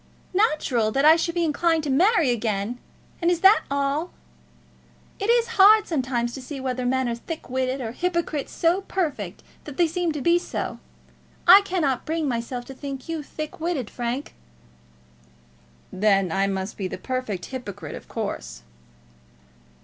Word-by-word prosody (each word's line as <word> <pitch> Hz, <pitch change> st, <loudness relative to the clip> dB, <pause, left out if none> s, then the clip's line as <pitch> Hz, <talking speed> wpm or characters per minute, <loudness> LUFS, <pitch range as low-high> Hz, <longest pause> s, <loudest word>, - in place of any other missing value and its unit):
"Natural 305 Hz, -, +2 dB
that 275 Hz, +2 st, +2 dB
I 315 Hz, +1 st, +9 dB
should 335 Hz, +1 st, -1 dB
be 345 Hz, -, +1 dB
inclined 325 Hz, +1 st, +1 dB
to 290 Hz, -, -1 dB
marry 335 Hz, -, +4 dB
again! 220 Hz, 0 st, -2 dB, 0.4 s
And 340 Hz, -, +3 dB
is 345 Hz, -1 st, +1 dB
that 390 Hz, +3 st, +6 dB
all? 280 Hz, +4 st, 0 dB, 1.1 s
It 405 Hz, +2 st, -2 dB
is 470 Hz, 0 st, +2 dB
hard 425 Hz, +2 st, +8 dB
sometimes 250 Hz, -6 st, -1 dB
to 270 Hz, -, -7 dB
see 275 Hz, +2 st, -7 dB
whether 255 Hz, -1 st, -2 dB
men 260 Hz, 0 st, +1 dB
are 235 Hz, -, -1 dB
thick 285 Hz, +4 st, -7 dB
witted, 260 Hz, +1 st, -1 dB
or 225 Hz, -2 st, -4 dB
hypocrites 340 Hz, 0 st, -2 dB
so 345 Hz, +3 st, +1 dB
perfect 290 Hz, -, -3 dB, 0.2 s
that 290 Hz, -3 st, -9 dB
they 345 Hz, -, +4 dB
seem 340 Hz, +1 st, -1 dB
to 300 Hz, -, -4 dB
be 340 Hz, +5 st, +3 dB
so. -, -, -4 dB, 0.7 s
I 380 Hz, +3 st, +10 dB
cannot 320 Hz, -10 st, -1 dB
bring 320 Hz, -1 st, -1 dB
myself 245 Hz, 0 st, -3 dB
to 270 Hz, -, -9 dB
think 275 Hz, 0 st, -7 dB
you 325 Hz, -2 st, -3 dB
thick 305 Hz, +1 st, -7 dB
witted, 320 Hz, -8 st, -2 dB
Frank." 245 Hz, +3 st, -4 dB, 1.6 s
"Then 195 Hz, -2 st, +2 dB
I 195 Hz, +3 st, +1 dB
must 190 Hz, +1 st, -3 dB
be 195 Hz, -, -2 dB
the -, -, -6 dB
perfect 220 Hz, -4 st, -3 dB
hypocrite, 250 Hz, -7 st, -7 dB
of -, -, -9 dB
course." 60 Hz, -1 st, -5 dB
275 Hz, 160 wpm, -24 LUFS, 240-340 Hz, 1.6 s, I